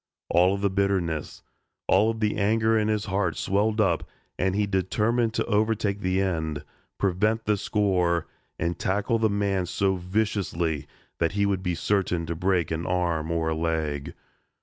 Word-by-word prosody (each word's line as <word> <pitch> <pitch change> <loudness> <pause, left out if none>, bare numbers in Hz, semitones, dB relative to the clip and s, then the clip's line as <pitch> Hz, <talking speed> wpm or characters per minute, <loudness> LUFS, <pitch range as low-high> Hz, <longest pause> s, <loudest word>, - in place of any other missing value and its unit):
All 90 +3 +4
of 100 - -5
the 100 -1 +1
bitterness 95 -6 -1 0.4
all 100 +4 +4
of 115 0 -3
the 105 -1 +1
anger 110 +2 +2
in 105 -1 +2
his 110 -1 0
heart 95 -4 -1
swelled 105 +3 +1
up 105 - +1 0.3
and 95 +1 0
he 105 0 +2
determined 110 +4 0
to - - 0
overtake 105 -2 +1
the 95 -1 0
end, 80 -6 -1 0.3
prevent 105 +4 +1
the 105 - +3
score 95 -5 +1 0.3
and 85 +1 -2
tackle 105 +4 0
the 110 -1 +3
man 100 -3 0
so 95 +1 +1
viciously 90 -5 -1 0.3
that 85 +1 +1
he 100 0 +1
would 100 -2 0
be 90 -2 -1
certain 90 -2 0
to 85 +1 -3
break 90 -2 0
an 80 +2 -2
arm 85 -3 0
or 85 -1 0
a 80 - 0
leg. 80 -3 -2
95 Hz, 170 wpm, -26 LUFS, 85-105 Hz, 0.4 s, All